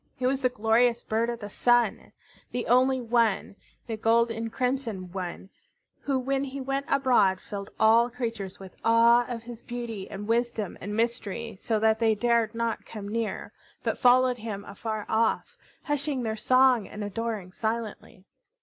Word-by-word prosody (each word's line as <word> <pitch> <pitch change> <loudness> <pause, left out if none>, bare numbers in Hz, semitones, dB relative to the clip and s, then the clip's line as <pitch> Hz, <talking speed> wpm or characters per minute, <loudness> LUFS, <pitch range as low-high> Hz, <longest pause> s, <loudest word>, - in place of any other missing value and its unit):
He 255 - -3
was 265 +1 +1
the 255 - +3
glorious 235 +1 +2
bird 225 +2 0
of 235 -1 -4
the 205 - -5
Sun, 240 0 +2 0.4
the 245 - -2
only 260 +2 +4
one, 230 -4 +1 0.3
the 225 - -3
gold 230 +2 +3
and 225 0 -4
crimson 235 -8 -2
one, 185 0 -6 0.5
who 275 -2 -1
when 270 +1 -1
he 275 0 -5
went 275 +1 -2
abroad 245 -9 +3
filled 200 +1 -7
all 230 +2 +5
creatures 230 -6 -5
with 190 -2 -11
awe 235 +1 +5
of 235 -2 -5
his 235 -1 -9
beauty 235 -5 -6
and 205 +1 -7
wisdom 230 -3 0
and 205 +3 -4
mystery, 230 -1 -2
so 225 - 0
that 220 0 +3
they 225 -2 +3
dared 230 0 +1
not 230 0 -2
come 210 -3 -8
near, 225 0 -3 0.3
but - - 0
followed 250 0 +4
him 210 -2 -5
afar 215 +1 -5
off, 230 - 0 0.3
hushing 290 -3 -1
their 220 -1 -1
song 255 0 +4
and 210 - -7
adoring 205 -2 -4
silently. 220 -3 -4
230 Hz, 165 wpm, -27 LUFS, 215-245 Hz, 0.5 s, all